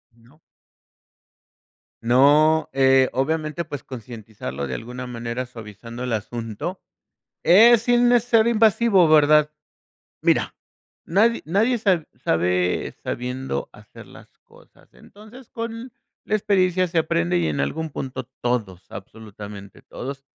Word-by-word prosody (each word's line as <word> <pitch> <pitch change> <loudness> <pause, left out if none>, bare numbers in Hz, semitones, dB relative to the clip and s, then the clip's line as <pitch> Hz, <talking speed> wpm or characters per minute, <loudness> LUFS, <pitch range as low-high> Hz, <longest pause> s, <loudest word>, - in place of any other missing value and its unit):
No. 120 +7 -24 1.6
No, 145 +6 +4
eh, 135 -1 +4
obviamente, 155 +4 -2
pues, 145 -5 -7
concientizarlo 110 - -7
de 65 - -4
alguna 125 - -7
manera 120 +1 -5
suavizando 115 +1 -10
el 125 -2 -2
asunto, 115 - -5 0.7
eh, 225 +7 +7
sin 240 +1 +3
ser 230 -1 +2
invasivo, 220 -5 +4
¿verdad? 150 0 +4 0.7
Mira, - - +1 0.5
nadi 225 +6 +2
nadie 215 +10 +1
sab 190 -8 0
sabe 90 -2 0
sabiendo 125 - -4
hacer - - -15
las - - -17
cosas. - - -23
Entonces, 215 - -16
con 230 +2 -6 0.3
la 215 - -1
experiencia 185 -3 +1
se 170 -1 0
aprende 90 - 0
y 85 -2 0
en 75 -2 -2
algún 160 - -2
punto 130 -2 -6 0.2
todos, 110 -7 -2
absolutamente 105 -1 -11
todos, 135 +1 -8
135 Hz, 115 wpm, -22 LUFS, 115-190 Hz, 1.6 s, eh